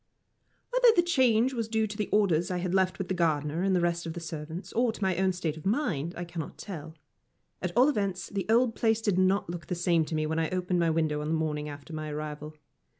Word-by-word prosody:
Whether - - +5
the 345 - +5
change 260 -6 +3
was 230 -3 -2
due 220 -1 +1
to 210 -1 -6
the 210 - -2
orders 180 -5 +2
I 180 - -1
had 180 0 -2
left 185 -1 +2
with 190 - -4
the 190 - -1
gardener 160 -2 0
and 190 0 +2
the 180 - +2
rest 170 0 0
of 165 - -4
the 170 - -5
servants, 160 +2 -7
or 240 0 +2
to - - -11
my 190 -2 +2
own 190 0 +2
state 165 -4 -3
of 155 - -10
mind, 190 - -1
I 175 - -4
cannot 165 -3 -6
tell. 160 -5 -8 0.7
At 180 - -2
all 255 +3 +7
events, 200 -9 -1
the 200 -1 -4
old 230 +1 +4
place 225 0 +2
did 205 -4 +1
not 190 +2 +2
look 170 -3 -6
the 180 - -2
same 170 -1 +2
to 155 - -4
me 155 0 0
when 160 +1 -1
I 160 - 0
opened 180 -1 0
my 170 -1 +3
window 155 -2 0
on 150 - -3
the 160 - +1
morning 150 -2 -2
after 145 +3 -9
my 155 0 -4
arrival. 150 0 -6
175 Hz, 250 wpm, -29 LUFS, 160-205 Hz, 0.7 s, all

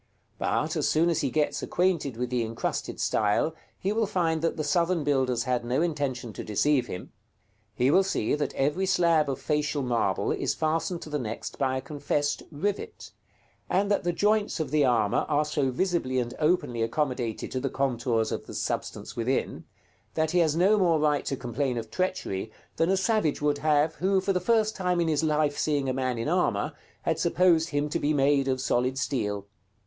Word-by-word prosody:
But, - - 0
as - - +1
soon 165 +2 +3
as 165 - 0
he 140 - 0
gets 150 +2 0
acquainted 170 -9 0
with 125 0 -3
the 125 -1 +1
incrusted 115 +1 -3
style, 105 +9 +1 0.2
he 195 +2 -1
will 220 -1 +1
find 165 -4 0
that 165 - 0
the 155 - -1
Southern 170 +2 +1
builders 130 -4 +1
had 125 -2 0
no 125 +6 0
intention 135 -8 -2
to - - -6
deceive 125 +4 +1
him. 90 - -7 0.6
He 125 +3 +3
will 190 - +6
see 190 - -1
that 150 0 -1
every 150 +8 0
slab 170 -5 +3
of 135 -1 -2
facial 150 0 -1
marble 120 -2 0
is - - -1
fastened 165 +2 -1
to 155 - -10
the 150 - -1
next 115 -3 -5
by 130 -1 +1
a - - -3
confessed 145 +1 -1
rivet, 205 - -4 0.6
and 200 +2 +1
that 205 - +2
the 175 - +1
joints 210 +2 +1
of 150 -4 -2
the 150 -1 +3
armor 115 -6 +2
are 150 0 +2
so 145 -3 0
visibly 135 -2 0
and 120 -1 -1
openly 150 -7 +1
accommodated 120 -1 -2
to 130 - -1
the 135 +1 -2
contours 120 -4 0
of - - -4
the - - -8
substance - - -4
within, 125 +3 -1 0.5
that 160 -1 +1
he 180 - +3
has 160 -3 +3
no 195 +5 +4
more 170 -4 +3
right 150 -1 +1
to 135 - -1
complain 125 +1 -2
of 115 -1 -5
treachery 110 - -2 0.3
than 165 +1 +2
a 195 - +3
savage 195 -6 +1
would 145 -1 +1
have, 155 0 +2
who, 190 +3 +1
for 195 +1 0
the 180 - +1
first 220 +3 +2
time 180 -2 0
in 170 - +1
his 155 -1 +1
life 150 -2 +1
seeing 145 -3 0
a 130 - 0
man 130 -2 -1
in 115 - -2
armor, 150 - +1 0.3
had - - 0
supposed 170 -3 +3
him 145 0 0
to 150 - -2
be 150 +1 +1
made 140 0 +3
of 130 -1 0
solid 130 0 0
steel. 105 -8 -2
150 Hz, 200 wpm, -27 LUFS, 130-170 Hz, 0.6 s, will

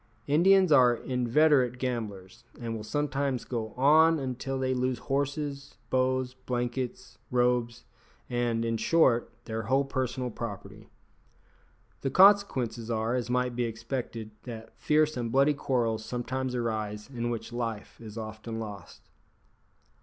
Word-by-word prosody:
Indians 185 +4 +5
are 125 -4 +6
inveterate 125 +1 +2
gamblers, 115 -4 -4 0.2
and 115 -2 -4
will 110 - -6
sometimes 140 +1 -1
go 115 -3 -3
on 155 +5 +5
until 135 -1 -3
they 130 0 0
lose 125 0 0
horses, 140 0 -3 0.2
bows, 130 0 +1
blankets, 125 0 -4
robes, 125 -1 +1 0.4
and, 120 -2 0
in 115 0 0
short, 125 -5 +3
their 110 -1 -3
whole 135 +5 +1
personal 130 -2 -2
property. 105 -3 -7 1.1
The 135 - -1
consequences 135 - +4
are, 115 0 0
as 125 -1 -2
might 125 0 0
be 120 0 0
expected, 115 -1 -5
that 115 -3 -9
fierce 155 0 +2
and 120 -2 -3
bloody 140 +3 +4
quarrels 120 -6 -1
sometimes 125 +2 -3
arise 110 -3 -3
in 120 -3 -3
which 120 0 -5
life 115 -2 -4
is 110 -1 -9
often 110 +1 -6
lost. 105 -3 -8
125 Hz, 130 wpm, -29 LUFS, 115-135 Hz, 1.1 s, are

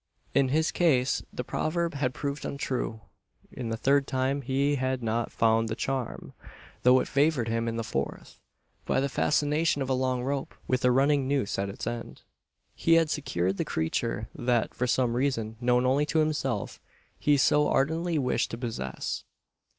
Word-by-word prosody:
In 140 -1 +4
his 155 +4 +2
case 135 -7 +2
the 125 - -4
proverb 170 +6 -1
had 135 -3 -1
proved 140 0 -3
untrue. 130 -5 -3 0.5
In 120 -3 -5
the 115 - -2
third 140 +4 +2
time 130 +1 0
he 140 +2 +1
had 130 -1 -1
not 115 +1 -1
found 115 0 +2
the 110 - -2
"charm"; 130 -2 -3 0.5
though 125 +1 +6
it - - -4
favoured 140 -4 +2
him 115 +1 -1
in 115 - -2
the 115 - -2
fourth. 70 -10 -4 0.5
By - - +2
the 140 - +1
fascination 150 +3 +1
of 135 -1 -2
a - - +4
long 130 -1 0
rope, 140 +1 -3
with 130 -1 0
a 125 - +5
running 135 +2 +3
noose 135 -9 0
at 100 0 -1
its 100 - -6
end, 120 -1 -5 0.5
he 165 - +3
had 165 -2 +3
secured 95 - -1
the - - 0
creature 105 +7 -2
that, 120 -2 0
for 125 - -1
some 120 -1 +1
reason 120 -4 -1
known 125 +1 +3
only 140 +3 +2
to 160 - 0
himself, 155 -1 -1 0.4
he 145 -1 +3
so 150 +2 +3
ardently 160 +4 +1
wished 130 -3 0
to 115 - -5
possess. 110 - -4
130 Hz, 175 wpm, -28 LUFS, 115-145 Hz, 0.5 s, though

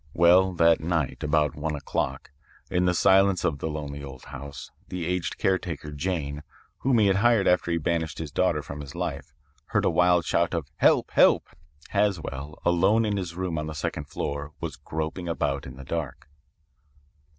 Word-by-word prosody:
"Well, 90 +3 +5
that 85 -1 +4
night, 80 -4 -1
about 75 -1 +2
one 75 +1 -2
o'clock, 70 - -3 0.4
in 90 0 +2
the 90 - +3
silence 95 0 +4
of 75 -4 0
the 80 - -2
lonely 70 -2 -5
old 70 -2 -10
house, 70 +1 -9 0.2
the 90 -2 -4
aged 90 0 -2
caretaker, 85 -6 -1
Jane, 75 -2 -3 0.4
whom 130 -2 +2
he 110 - +4
had 100 -1 +3
hired 115 -1 +4
after 90 -1 +3
he 85 - +1
banished 80 -1 -1
his 80 -3 -5
daughter 75 0 +1
from 70 +2 -7
his 70 -2 -9
life, - - -4 0.3
heard - - 0
a - - +3
wild 90 -1 +3
shout 85 +1 +1
of 80 -4 -2
'Help! - - +3
Help!' - - +4 0.4
Haswell, 80 -8 -1
alone 95 +6 +3
in 105 -1 0
his 90 -3 -4
room 90 -3 -2
on 75 - -4
the 80 - -5
second 75 0 -3
floor, 70 +1 -4
was - - -4
groping 80 +3 -4
about 70 -4 -1
in 65 - -9
the 70 0 -10
dark. 75 -4 -4
80 Hz, 180 wpm, -26 LUFS, 75-90 Hz, 0.4 s, Well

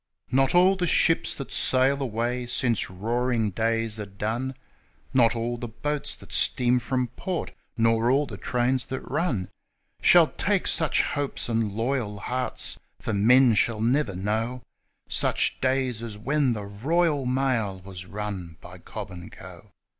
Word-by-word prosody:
Not 135 +4 +3
all 185 +2 +6
the 180 -2 -1
ships 165 +1 +2
that 135 - -7
sail 135 +2 +3
away 120 0 -2
since 120 -2 +1
Roaring 115 +3 -1
Days 115 +1 -1
are 105 - -5
done 110 +7 -3 0.6
Not 120 -3 +4
all 120 +1 -2
the 120 - -4
boats 145 +6 -3
that - - -13
steam 125 0 +3
from 125 -1 -1
port, 180 +8 -4 0.3
nor 115 +1 +3
all 140 +3 +3
the - - -8
trains 125 0 0
that 130 - -4
run, 125 - -1 0.5
Shall - - +7
take - - 0
such - - +2
hopes 145 -4 -2
and 110 -3 0
loyal 115 -2 -1
hearts 125 +5 -4 0.2
for - - -3
men 120 +4 +5
shall 110 +1 +1
never 120 -2 +1
know 110 +6 -2 0.4
Such - - 0
days 130 -3 0
as 115 -3 -6
when 135 +3 +1
the 105 -2 -5
Royal 145 +7 0
Mail 125 -7 0
was 95 -1 -9
run 95 -5 -5
by 90 +1 -12
Cobb 105 +1 -8
and 90 -1 -9
Co. 95 +2 -12
120 Hz, 155 wpm, -26 LUFS, 105-130 Hz, 0.6 s, Shall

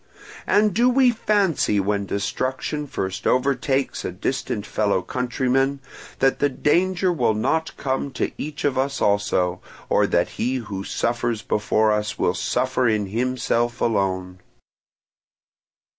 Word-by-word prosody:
And 210 -1 +3
do 240 +6 +4
we 255 0 +4
fancy 200 - +1
when 100 0 -1
destruction 130 +9 -2
first 95 -7 -3
overtakes 135 +1 +1
a - - -3
distant 105 +2 -3
fellow 100 -3 0
countryman 130 +2 0 0.4
that 135 0 +2
the 145 - +3
danger 180 +6 +1
will 120 -8 +1
not 160 +9 -1
come 135 +1 -2
to - - -1
each 150 -1 -5
of 135 -2 +1
us 140 +1 -1
also, 95 -3 +1 0.3
or - - +3
that - - +1
he 125 +2 +1
who 105 -6 -4
suffers 115 0 -1
before 110 +1 +1
us 105 0 -1
will 90 - +1
suffer 125 +6 0
in 105 -2 +1
himself 120 +1 0
alone? 95 -4 -1
125 Hz, 130 wpm, -23 LUFS, 105-140 Hz, 0.4 s, do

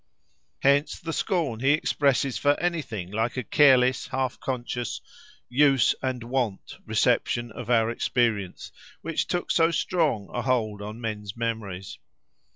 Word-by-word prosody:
Hence 140 +2 +3
the 165 -1 -5
scorn 160 - -1
he 135 +3 +3
expresses 140 -3 +1
for 145 0 +2
anything 125 - -3
like 110 +4 -1
a 125 - -1
careless, 130 -2 +4
half 130 -1 -2
conscious, 120 -2 -3 0.5
"use 135 -1 +4
and 130 -2 -2
wont" 120 -5 -3
reception 120 -1 +1
of 120 +1 -8
our 115 -1 +3
experience, 110 -6 -1 0.3
which 165 - -1
took 175 -1 -2
so 165 -1 +4
strong 155 - 0
a - - -1
hold 110 -5 0
on 105 +2 -7
men's 105 -2 -5
memories! 110 -5 -4
125 Hz, 135 wpm, -26 LUFS, 110-140 Hz, 0.5 s, careless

